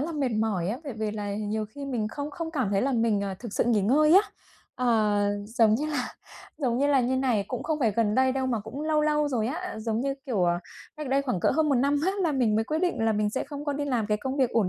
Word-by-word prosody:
là 325 Hz, +4 st, -2 dB
mệt 285 Hz, -4 st, 0 dB
mỏi 195 Hz, -6 st, 0 dB
á, 230 Hz, +6 st, -2 dB
về 280 Hz, -, -5 dB
về 215 Hz, -1 st, -3 dB
là 205 Hz, -1 st, -4 dB
nhiều 215 Hz, +1 st, -2 dB
khi 285 Hz, -, -6 dB
mình 240 Hz, -6 st, -2 dB
không 285 Hz, +5 st, -5 dB
không 320 Hz, +2 st, -5 dB
cảm 260 Hz, -, -1 dB
thấy 195 Hz, -1 st, +1 dB
là 275 Hz, -, +1 dB
mình, 225 Hz, -4 st, +1 dB
à, 195 Hz, -1 st, -3 dB
thực 235 Hz, -4 st, -8 dB
sự -, -, +1 dB
nghỉ 230 Hz, -3 st, +3 dB
ngơi 300 Hz, +9 st, +4 dB
á. 385 Hz, -, +9 dB, 0.5 s
À, 215 Hz, -4 st, +2 dB, 0.2 s
giống 225 Hz, -1 st, +3 dB
như 290 Hz, +7 st, -1 dB
là 290 Hz, -5 st, -2 dB, 0.5 s
giống 250 Hz, -5 st, 0 dB
như 280 Hz, -, +3 dB
là 285 Hz, -2 st, +4 dB
như 255 Hz, +2 st, 0 dB
này, 250 Hz, -6 st, +1 dB
cũng 250 Hz, -, -4 dB
không 310 Hz, -1 st, -1 dB
phải 230 Hz, -5 st, +3 dB
gần 210 Hz, 0 st, +1 dB
đây 260 Hz, +1 st, +3 dB
đâu 265 Hz, 0 st, -1 dB
mà 235 Hz, -4 st, 0 dB
cũng 220 Hz, +7 st, -7 dB
lâu 310 Hz, -1 st, +2 dB
lâu 300 Hz, -1 st, +2 dB
rồi 230 Hz, -5 st, 0 dB
á, 345 Hz, +1 st, -4 dB
giống 220 Hz, 0 st, -1 dB
như, 275 Hz, +1 st, -1 dB
kiểu, 215 Hz, -8 st, 0 dB
ờ, 175 Hz, 0 st, +2 dB, 0.4 s
cách 300 Hz, -2 st, -5 dB
đây 275 Hz, +1 st, +2 dB
khoảng 250 Hz, -10 st, -2 dB
cỡ -, -, +3 dB
hơn 315 Hz, -1 st, +3 dB
một 280 Hz, -, +3 dB
năm 280 Hz, +3 st, +2 dB
á 380 Hz, -, +2 dB
là 330 Hz, -4 st, +1 dB
mình 245 Hz, -6 st, +2 dB
mới 220 Hz, -, +1 dB
quyết 310 Hz, +6 st, -1 dB
định 350 Hz, -9 st, 0 dB
là 225 Hz, -, +3 dB
mình 210 Hz, 0 st, 0 dB
sẽ 260 Hz, -, -2 dB
không 290 Hz, 0 st, -7 dB
có 290 Hz, -, -1 dB
đi 290 Hz, +1 st, -2 dB
làm 245 Hz, -7 st, 0 dB
cái 210 Hz, -, +1 dB
công 265 Hz, +2 st, -3 dB
việc 260 Hz, -4 st, +2 dB
ổn 220 Hz, -5 st, +2 dB
250 Hz, 290 wpm, -27 LUFS, 215-285 Hz, 0.5 s, á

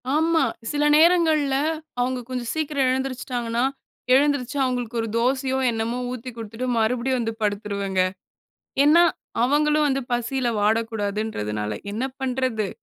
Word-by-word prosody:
ஆமா. 325 Hz, +1 st, +3 dB, 0.3 s
சில 295 Hz, 0 st, 0 dB
நேரங்கள்ல 315 Hz, -4 st, +4 dB, 0.4 s
அவங்க 255 Hz, +1 st, 0 dB
கொஞ்சம் 245 Hz, -2 st, -3 dB
சீக்கிரம் 295 Hz, -4 st, 0 dB
எழுந்திரிச்சுட்டாங்கன்னா, 250 Hz, -2 st, -2 dB, 0.5 s
எழுந்திருச்சு 285 Hz, -1 st, +2 dB
அவங்களுக்கு 245 Hz, -2 st, -2 dB
ஒரு 225 Hz, -, -3 dB
தோசையோ 260 Hz, +2 st, +1 dB
என்னமோ 225 Hz, +2 st, -2 dB
ஊத்திக் 250 Hz, -1 st, -7 dB
குடுத்துட்டு 225 Hz, +3 st, -5 dB
மறுபடியும் 245 Hz, +3 st, +1 dB
வந்து 225 Hz, -1 st, -2 dB
படுத்துருவங்க. 200 Hz, -2 st, -1 dB, 0.8 s
ஏன்னா, 330 Hz, +4 st, +6 dB, 0.4 s
அவங்களும் 300 Hz, +3 st, +3 dB
வந்து 270 Hz, 0 st, 0 dB
பசில 240 Hz, +1 st, 0 dB
வாடக்கூடாதுன்றதுனால 205 Hz, -, -1 dB, 0.2 s
என்ன 230 Hz, +5 st, -2 dB, 0.2 s
பண்றது. 255 Hz, -5 st, -1 dB
250 Hz, 110 wpm, -23 LUFS, 225-275 Hz, 0.8 s, ஏன்னா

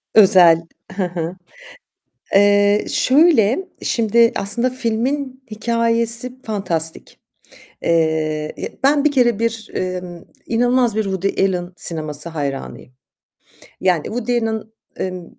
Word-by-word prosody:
Özel, 180 Hz, -6 st, +6 dB, 0.3 s
he 190 Hz, 0 st, -2 dB
he. 175 Hz, 0 st, -4 dB, 1.0 s
Eee, 205 Hz, +1 st, +4 dB
şöyle, 285 Hz, -, +3 dB
şimdi 230 Hz, +1 st, +2 dB
aslında 235 Hz, +6 st, -1 dB
filmin 255 Hz, +3 st, -3 dB
hikâyesi 230 Hz, +2 st, 0 dB
fantastik. 170 Hz, -7 st, -3 dB, 0.6 s
Eee, 160 Hz, -2 st, 0 dB, 0.3 s
ben 285 Hz, +1 st, +3 dB
bir 300 Hz, -, +3 dB
kere 240 Hz, -5 st, +2 dB
bir, 230 Hz, -1 st, -3 dB
emm, 180 Hz, -2 st, -5 dB, 0.2 s
inanılmaz 245 Hz, -1 st, +1 dB
bir 220 Hz, -, +2 dB
Woody 195 Hz, 0 st, -1 dB
Allen 180 Hz, -2 st, -2 dB
sineması 155 Hz, -2 st, +1 dB
hayranıyım 140 Hz, -4 st, -6 dB, 0.9 s
yani 180 Hz, -5 st, +1 dB
Woody 240 Hz, +1 st, -2 dB
Allen, 220 Hz, -1 st, -2 dB, 0.3 s
emm 185 Hz, -2 st, -5 dB
210 Hz, 100 wpm, -19 LUFS, 175-235 Hz, 1.0 s, Özel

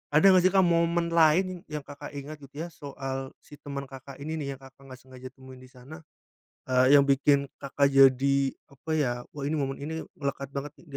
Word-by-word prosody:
ada 155 Hz, -, +5 dB
enggak 185 Hz, -1 st, +5 dB
sih, -, -, +1 dB
Kak 190 Hz, -1 st, +5 dB
momen 170 Hz, 0 st, +1 dB
lain 170 Hz, +2 st, +3 dB
yang 150 Hz, -2 st, -6 dB
Kakak 145 Hz, +1 st, -10 dB
ingat 145 Hz, +2 st, -7 dB
gitu 140 Hz, -1 st, -16 dB
ya -, -, -5 dB
soal 135 Hz, -2 st, -6 dB
si 145 Hz, 0 st, -15 dB
temen 140 Hz, -1 st, -6 dB
Kakak 135 Hz, 0 st, -11 dB
ini 160 Hz, +1 st, -4 dB
nih 140 Hz, -2 st, -4 dB
yang 135 Hz, -, -19 dB
Kakak 135 Hz, 0 st, -16 dB
enggak 130 Hz, -1 st, -11 dB
sengaja 130 Hz, 0 st, -12 dB
temuin 130 Hz, -1 st, -14 dB
di 130 Hz, -, -14 dB
sana, 130 Hz, +6 st, -13 dB, 0.7 s
eee, 130 Hz, +2 st, +5 dB
yang 140 Hz, -, +4 dB
bikin 140 Hz, 0 st, +3 dB, 0.2 s
Kakak 140 Hz, +1 st, 0 dB
jadi 135 Hz, 0 st, +5 dB, 0.3 s
apa 140 Hz, +4 st, -9 dB
ya, 130 Hz, -5 st, +1 dB, 0.2 s
"Oh 140 Hz, -, -4 dB
ini 150 Hz, -, -1 dB
momen 135 Hz, -1 st, -2 dB
ini 160 Hz, +3 st, -5 dB, 0.2 s
melekat 140 Hz, -1 st, -4 dB
banget 140 Hz, +1 st, -6 dB
nih -, -, -21 dB
140 Hz, 210 wpm, -27 LUFS, 135-155 Hz, 0.7 s, ada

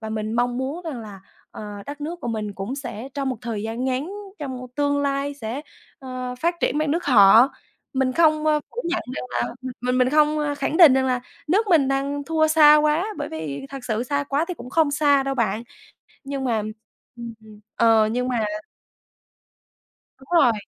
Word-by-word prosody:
và 220 Hz, -1 st, -6 dB
mình 215 Hz, 0 st, -3 dB
mong 245 Hz, +1 st, 0 dB
muốn 275 Hz, +7 st, -3 dB
rằng 285 Hz, -7 st, -5 dB
là, 205 Hz, -3 st, -10 dB, 0.3 s
ờ, -, -, -9 dB, 0.2 s
đất 290 Hz, +1 st, -7 dB
nước 325 Hz, +4 st, -4 dB
của -, -, -4 dB
mình 215 Hz, -2 st, -3 dB
cũng 195 Hz, +7 st, -5 dB
sẽ 245 Hz, -2 st, -6 dB
trong 275 Hz, -2 st, -2 dB
một 255 Hz, -, -2 dB
thời 220 Hz, -3 st, -4 dB
gian 225 Hz, +3 st, -3 dB
ngắn, 265 Hz, +7 st, -1 dB, 0.3 s
trong 260 Hz, -3 st, -6 dB
tương 285 Hz, 0 st, +1 dB
lai 280 Hz, 0 st, -1 dB
sẽ, 245 Hz, +1 st, -5 dB, 0.4 s
ờ, 255 Hz, -1 st, -5 dB
phát 340 Hz, +1 st, +1 dB
triển 295 Hz, -, +1 dB
bằng 310 Hz, -1 st, 0 dB
nước 335 Hz, +4 st, -1 dB
họ. 230 Hz, 0 st, +7 dB, 0.4 s
Mình 265 Hz, -1 st, +1 dB
không, 310 Hz, -1 st, +3 dB
ơ, 300 Hz, -1 st, +3 dB
phủ 485 Hz, -, -5 dB
nhận 345 Hz, +1 st, -1 dB
rằng -, -, -4 dB
là -, -, -2 dB, 0.3 s
mình 250 Hz, +1 st, 0 dB
mình 255 Hz, 0 st, +4 dB
không, 305 Hz, 0 st, +3 dB
a, 295 Hz, -1 st, -1 dB
khẳng 285 Hz, +2 st, -2 dB
định 325 Hz, -7 st, +9 dB
rằng 265 Hz, 0 st, +2 dB
là 250 Hz, -1 st, 0 dB, 0.3 s
nước 415 Hz, +6 st, +2 dB
mình 310 Hz, -7 st, +4 dB
đang 280 Hz, +1 st, -1 dB
thua 320 Hz, 0 st, +2 dB
xa 305 Hz, -1 st, +7 dB
quá, 305 Hz, +5 st, +2 dB
bởi -, -, -3 dB
vì 160 Hz, -, -6 dB
thật 275 Hz, -2 st, -8 dB
sự 220 Hz, 0 st, -1 dB
xa 285 Hz, +2 st, -1 dB
quá 280 Hz, +4 st, 0 dB
thì 360 Hz, -, -3 dB
cũng 250 Hz, -, -10 dB
không 320 Hz, -2 st, +3 dB
xa 285 Hz, -1 st, +3 dB
đâu 270 Hz, 0 st, -2 dB
bạn. 225 Hz, -2 st, 0 dB, 0.6 s
Nhưng 275 Hz, 0 st, -4 dB
mà, 230 Hz, -4 st, 0 dB, 0.6 s
ừm, 235 Hz, -1 st, -7 dB, 0.4 s
ờ, 225 Hz, -2 st, +4 dB
nhưng 250 Hz, +2 st, -1 dB
mà 235 Hz, -4 st, 0 dB, 1.7 s
Đúng 265 Hz, -, -18 dB
rồi. 245 Hz, -4 st, +5 dB
270 Hz, 200 wpm, -23 LUFS, 240-295 Hz, 1.7 s, định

